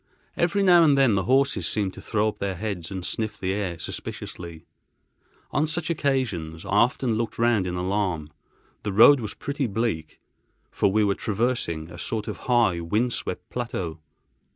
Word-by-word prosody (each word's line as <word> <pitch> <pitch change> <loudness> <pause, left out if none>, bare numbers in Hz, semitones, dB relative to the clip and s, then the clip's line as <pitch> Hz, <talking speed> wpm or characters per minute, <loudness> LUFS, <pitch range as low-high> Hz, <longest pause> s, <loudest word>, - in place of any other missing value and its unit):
Every 195 +4 +1
now 175 -3 +7
and 145 -3 +5
then 135 -5 +5
the 95 -1 +1
horses 135 +3 +2
seemed 100 -3 -1
to - - -10
throw 110 -1 0
up 105 - -9
their 100 -1 -2
heads 95 -4 -4
and 95 -2 -5
sniffed 110 -1 -3
the 95 0 -1
air 95 -4 -2
suspiciously. 80 +1 -7 0.9
On 150 +3 +1
such 165 +1 -2
occasions 115 - -1
I - - -8
often 120 +4 +2
looked 115 -2 -3
round 115 -5 +2
in 90 - -3
alarm. 90 -4 -1 0.5
The 105 - -3
road 135 +7 +8
was 110 -3 -5
pretty 140 -2 -2
bleak, 105 -8 -2 0.5
for - - +2
we 110 +2 +3
were 100 -1 +2
traversing 100 -8 -2
a 85 - -10
sort 110 +4 -3
of - - -4
high, 115 -8 +3
wind 110 +9 0
swept - - -4
plateau. 95 -9 -4
105 Hz, 175 wpm, -25 LUFS, 90-125 Hz, 0.9 s, road